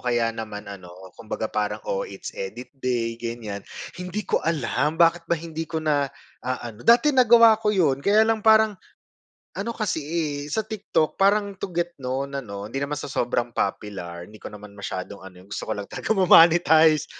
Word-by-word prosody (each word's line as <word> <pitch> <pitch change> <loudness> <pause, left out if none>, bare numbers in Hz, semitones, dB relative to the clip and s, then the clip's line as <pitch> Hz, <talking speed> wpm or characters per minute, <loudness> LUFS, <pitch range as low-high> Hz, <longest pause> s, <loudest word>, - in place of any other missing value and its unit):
kaya 120 -2 0
naman 110 -2 -7
ano, 100 -3 -10 0.2
kumbaga 110 0 -6
parang," 105 0 -2
Oh, 95 - -2
it's 100 -1 -8
edit 110 +6 -7
day, 120 -2 -2
ganyan." 115 -4 -5 0.4
Hindi 180 +4 -4
ko - - 0
alam 160 -1 -1
bakit 165 0 +3
ba 170 - +2
hindi 165 -1 -6
ko 160 - -4
na 150 -3 +1 0.3
aano. 120 -3 -5
Dati 245 - +5
nagawa 230 -3 +6
ko 215 - 0
yun 160 -10 +2
kaya 210 +7 +4
lang 225 0 +1
parang 220 0 +5 0.8
ano 205 +4 -3
kasi, 215 -8 -2
eh, 150 -2 -3
sa 220 +4 -1
TikTok 205 -7 -1
parang 200 +1 +2
to 190 - -6
get 175 0 -2
known 135 +2 -3
ano, 100 -7 -6
hindi 135 +6 -4
naman 145 0 -3
sa - - -6
sobrang 120 -3 -2
popular. 90 -4 -4
Hindi 105 0 -16
ko - - -7
naman 105 -1 -12
masyadong 100 -1 -6
ano, 90 -1 -13
gusto 100 - -6
ko 110 - -2
lang 100 - -5
talaga - - -7
ma 195 -4 +3
monetize. 160 -3 +6
145 Hz, 180 wpm, -24 LUFS, 110-180 Hz, 0.8 s, nagawa